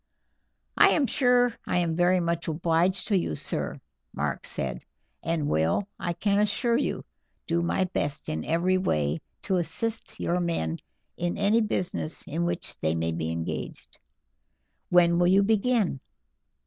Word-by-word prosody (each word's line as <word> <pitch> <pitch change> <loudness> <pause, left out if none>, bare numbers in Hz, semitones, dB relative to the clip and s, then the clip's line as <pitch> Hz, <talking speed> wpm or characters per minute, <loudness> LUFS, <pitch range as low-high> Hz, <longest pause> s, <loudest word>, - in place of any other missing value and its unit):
"I - - +7
am 290 - +2
sure 245 -2 +3
I - - +1
am 170 -2 +1
very 180 +2 +3
much 170 -1 -1
obliged 170 +3 +1
to 205 - +3
you, 170 - 0
sir," - - -1 0.4
Mark - - -2
said, 60 -2 -3 0.4
"and 165 -3 -1
will, 80 - +1
I 175 - -2
can 200 +4 +1
assure 220 +3 +2
you, - - -2 0.4
do 170 +1 0
my 170 +2 +1
best 150 -5 -3
in 80 0 -3
every 180 +3 +1
way 75 - 0 0.2
to 190 - +1
assist 220 +5 -3
your 175 +1 0
men 125 - -1 0.4
in 175 0 -2
any 205 +3 +3
business 180 -7 -2
in 170 +3 -2
which 175 0 -2
they 80 +1 0
may 80 0 -1
be 80 0 -3
engaged." 80 0 -5 0.9
"When 170 -1 +5
will 175 - +4
you 195 +2 +5
begin?" 215 - +1
175 Hz, 150 wpm, -27 LUFS, 155-200 Hz, 0.9 s, I